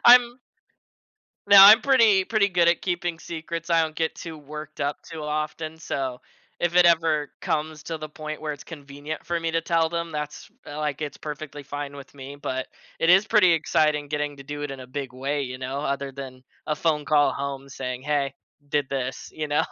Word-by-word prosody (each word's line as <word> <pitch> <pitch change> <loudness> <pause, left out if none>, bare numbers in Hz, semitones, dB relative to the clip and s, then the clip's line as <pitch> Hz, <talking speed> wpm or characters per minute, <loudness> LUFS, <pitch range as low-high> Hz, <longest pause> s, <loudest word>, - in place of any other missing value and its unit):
I'm 245 0 +7 1.1
No, 200 0 +7
I'm 210 +4 +11
pretty 225 -8 +5
pretty 210 -1 +2
good 175 -2 +3
at 170 - +2
keeping 175 -2 -2
secrets, 165 +1 -6
I 165 -1 +5
don't 155 -1 -3
get 160 -1 0
too 165 -2 -8
worked 150 +1 -9
up 145 +1 -1
too 160 -1 -8
often, 155 +1 -3
so, 130 -5 -3 0.4
if 175 0 0
it 180 - +7
ever 160 -3 +3
comes 155 0 -2
to 165 - -4
the 155 0 -7
point 155 0 -6
where 150 -1 -2
it's 145 - -10
convenient 145 0 -8
for 170 -1 -1
me 165 - -1
to 165 0 +1
tell 165 -1 +2
them, 170 -1 -3
that's, 150 +3 -5 0.2
like, 150 -1 -3
it's 150 -2 -4
perfectly 150 -1 -7
fine 145 0 -6
with 140 0 -12
me. 140 +1 -9
But, 130 -2 -3 0.3
it 165 - +1
is 190 +4 +6
pretty 185 -6 +5
exciting 150 -2 +1
getting 150 0 -2
to 140 - -10
do 145 +1 -6
it 145 - -3
in 135 - -7
a 130 - -9
big 135 0 -5
way, 140 +3 -2
you 130 -1 -5
know, 130 +2 -4
other 140 -1 -2
than 130 -2 -9 0.2
a 150 - 0
phone 150 -2 +1
call 145 -1 +4
home 140 0 -5
saying, 125 -1 -5
"Hey, 140 -2 0 0.3
did 145 -1 0
this," 130 -1 -3
you 155 -1 -3
know? 145 - +2
150 Hz, 205 wpm, -25 LUFS, 140-165 Hz, 1.1 s, I'm